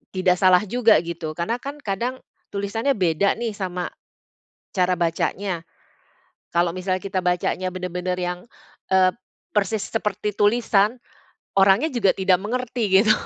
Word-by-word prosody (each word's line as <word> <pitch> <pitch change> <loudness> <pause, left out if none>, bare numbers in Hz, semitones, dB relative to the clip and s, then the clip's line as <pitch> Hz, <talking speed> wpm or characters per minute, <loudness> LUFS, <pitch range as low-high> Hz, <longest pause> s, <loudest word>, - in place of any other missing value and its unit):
tidak 185 -1 +3
salah 185 -1 +6
juga 230 +1 +4
gitu, 170 -2 -5
karena 175 +7 -1
kan 285 +3 -7
kadang 235 +6 -2 0.4
tulisannya 200 +6 -1
beda 185 0 +2
nih 235 -1 -2
sama 180 -3 -3 0.9
cara 185 -1 +2
bacanya. 170 +1 -1 0.9
Kalau 170 0 +2
misalnya 185 0 -1
kita 190 -1 -1
bacanya 180 +1 0
bener-bener 180 0 -3
yang, 180 0 -2 0.5
eee, 185 -1 +5 0.4
persis 210 0 0
seperti 210 -2 -2
tulisan, 215 +1 +3 0.6
orangnya 195 +9 +5
juga 215 -6 +3
tidak 185 -2 +3
mengerti 240 +1 -2
gitu. 215 0 +4
195 Hz, 125 wpm, -23 LUFS, 180-215 Hz, 0.9 s, salah